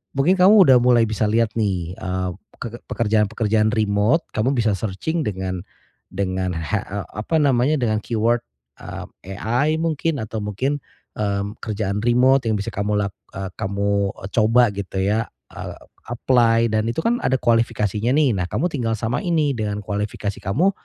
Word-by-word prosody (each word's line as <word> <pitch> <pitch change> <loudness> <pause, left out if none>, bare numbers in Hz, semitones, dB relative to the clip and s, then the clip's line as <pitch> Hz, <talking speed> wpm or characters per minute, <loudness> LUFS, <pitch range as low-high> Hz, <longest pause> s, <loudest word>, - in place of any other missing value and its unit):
mungkin 140 +7 +3
kamu 190 +4 +7
udah 130 -3 +7
mulai 120 -1 +5
bisa 110 0 -1
lihat 115 +1 +2
nih, 90 -5 -1
eee, 95 0 -3 0.3
peke 120 0 -7
pekerjaan-pekerjaan 110 -1 +1
remot 110 +8 +2
kamu 125 +6 0
bisa 115 -3 +2
searching 110 - -2
dengan 95 -2 -3 0.5
dengan 95 -1 -2
ha 80 +6 -1
e 100 - -5 0.2
apa 110 +10 -2
namanya 140 -1 +3
dengan 115 -6 0
keyword, 115 +2 +1 0.4
eee, 95 +1 -9
AI 125 +10 +1
mungkin 160 -4 -1
atau 110 +1 -5
mungkin, 115 +8 -2 0.4
mmm, 100 +1 -2
kerjaan 105 -2 -2
remot 125 +4 +4
yang 110 - +2
bisa 105 +2 -3
kamu 105 0 -1
lak 100 -1 0 0.2
eee, 95 -1 -5
kamu 100 0 0
e - - -4
coba 115 +1 +4
gitu 95 -1 -3
ya, 105 +3 +1 0.2
eee, - - -7 0.3
apply 115 -2 +2
dan 110 0 +1
itu 120 +8 -2
kan 240 +1 +1
ada 130 - +1
kualifikasinya 115 -1 +1
nih, 150 -4 +4
nah, 90 - -1
kamu 175 - -1
tinggal 115 -6 -1
samain 120 - -1
nih, 150 -3 +2
dengan 105 -4 -3
kualifikasi 105 0 -3
kamu 145 - +1
110 Hz, 160 wpm, -22 LUFS, 100-125 Hz, 0.5 s, kamu